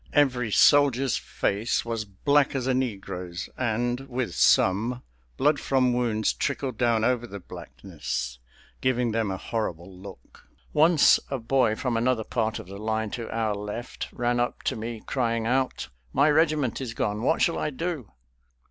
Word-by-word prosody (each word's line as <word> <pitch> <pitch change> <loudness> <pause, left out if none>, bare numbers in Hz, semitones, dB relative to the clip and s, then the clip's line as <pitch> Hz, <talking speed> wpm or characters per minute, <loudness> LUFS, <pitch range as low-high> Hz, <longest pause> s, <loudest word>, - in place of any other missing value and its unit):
Every 125 -5 +2
soldier's 135 +1 +4
face 105 +5 -1
was 115 -2 -3
black 140 +9 +1
as 130 -2 -1
a 130 - +2
negro's, 95 -8 -4
and, 120 0 -1
with 125 -7 -2
some, 110 +10 +3 0.3
blood 145 +1 +3
from 130 -2 +2
wounds 115 -3 +1
trickled 135 -4 -3
down 115 -3 +2
over 120 0 +1
the 100 -2 -8
blackness, 60 -4 -6 0.4
giving 125 -2 +1
them 110 -2 0
a 95 - -3
horrible 95 -4 -4
look. 95 +1 -13 0.3
Once 155 +1 +5
a 135 - -1
boy 120 -2 +2
from 125 -1 -1
another 120 -1 +1
part 110 -1 -1
of - - -8
the 100 +1 -9
line 110 0 -2
to 115 -2 -5
our 110 -2 -1
left 105 +4 -5
ran 120 0 0
up 120 - -2
to - - 0
me 115 0 -6
crying 115 -3 -1
out: 130 - 0 0.2
"My 145 +2 +4
regiment 150 -5 +2
is 115 -3 -5
gone! 105 +1 -1
what 160 +7 +2
shall 170 - +1
I - - -1
do?" 150 - -4
120 Hz, 160 wpm, -26 LUFS, 110-130 Hz, 0.4 s, Once